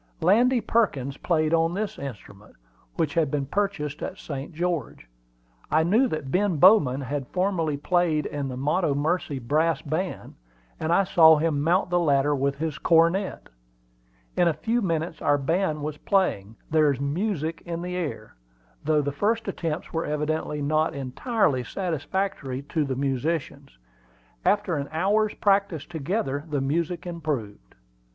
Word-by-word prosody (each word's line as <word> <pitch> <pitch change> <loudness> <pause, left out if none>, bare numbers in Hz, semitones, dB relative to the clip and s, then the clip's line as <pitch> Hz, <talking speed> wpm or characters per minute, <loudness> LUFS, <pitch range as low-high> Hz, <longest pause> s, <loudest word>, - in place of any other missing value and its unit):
Landy 235 +8 +4
Perkins 140 - 0
played 155 -2 +1
on 165 +1 +2
this 215 +1 -3
instrument, 105 -6 -9 0.4
which 155 -3 0
had 160 -4 +2
been 140 -1 -1
purchased 155 -4 -2
at 190 - -5
St. 140 -1 -6
George. 165 - -3 0.6
I 160 +1 +3
knew 220 +10 +3
that 155 - -4
Ben 185 -1 +1
Bowman 145 -7 +5
had 135 0 -4
formerly 180 -6 0
played 165 0 +1
in 145 -1 -3
the 130 -1 -5
Montomercy 150 +1 0
Brass 155 +6 0
Band, 165 +5 -3 0.5
and 160 - -1
I 185 +3 +4
saw 160 -4 +6
him 150 -2 0
mount 175 +4 +1
the 175 - +3
ladder 145 -3 +2
with 140 0 0
his 155 -1 -3
cornet. 170 +4 +2 0.9
In 175 - +3
a 165 - +1
few 235 +2 0
minutes 165 -4 -2
our 145 0 +3
band 155 +1 0
was 150 0 -4
playing 115 - 0 0.2
"There's 150 -4 +3
music 160 +2 -2
in 170 0 -5
the 180 0 -4
air," 150 -11 -4 0.5
though 150 0 +2
the 145 - -1
first 215 +10 0
attempts 165 -4 -4
were 165 0 -1
evidently 150 0 -2
not 155 +2 +1
entirely 140 - 0
satisfactory 160 -3 -3
to 155 -3 0
the 135 -1 -2
musicians. 140 - -2 0.7
After 205 -5 +1
an 140 0 -4
hour's 205 +6 +1
practice 195 -6 +1
together 150 -3 -2
the 145 -2 0
music 165 +6 -1
improved. 145 - -5
160 Hz, 145 wpm, -25 LUFS, 140-180 Hz, 0.9 s, saw